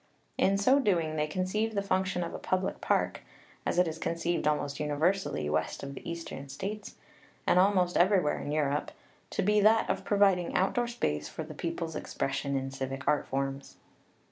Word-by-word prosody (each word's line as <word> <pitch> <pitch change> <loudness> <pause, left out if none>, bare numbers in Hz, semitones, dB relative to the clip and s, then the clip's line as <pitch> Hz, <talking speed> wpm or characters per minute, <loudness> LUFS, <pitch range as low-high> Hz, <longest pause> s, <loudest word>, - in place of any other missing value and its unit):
In 195 +1 +3
so 255 +8 +4
doing, 170 - +1
they 150 0 0
conceived 190 +7 -1
the 200 - +1
function 185 -2 0
of 170 - -5
a - - -5
public 185 +1 -1
park - - +1 0.5
as - - 0
it 180 -1 +4
is 160 0 -4
conceived 170 -1 -1
almost 145 -2 0
universally 150 - 0
west 75 - -1
of 140 0 -5
the 140 - -8
Eastern 165 -5 -6
States, 200 +9 -5 0.5
and 180 - +4
almost 185 -2 +3
everywhere 180 -4 +3
in 145 - -4
Europe 150 -1 0 0.4
to - - -1
be 210 +2 +4
that 220 +2 +5
of - - -3
providing 195 -4 +3
outdoor 235 +6 +2
space 75 - -2
for 160 - -5
the 155 0 -9
people's 165 0 -4
expression 140 -1 -2
in 135 0 -3
civic 135 +1 -5
art 150 -1 +2
forms. 135 +1 -3
170 Hz, 175 wpm, -30 LUFS, 145-195 Hz, 0.5 s, that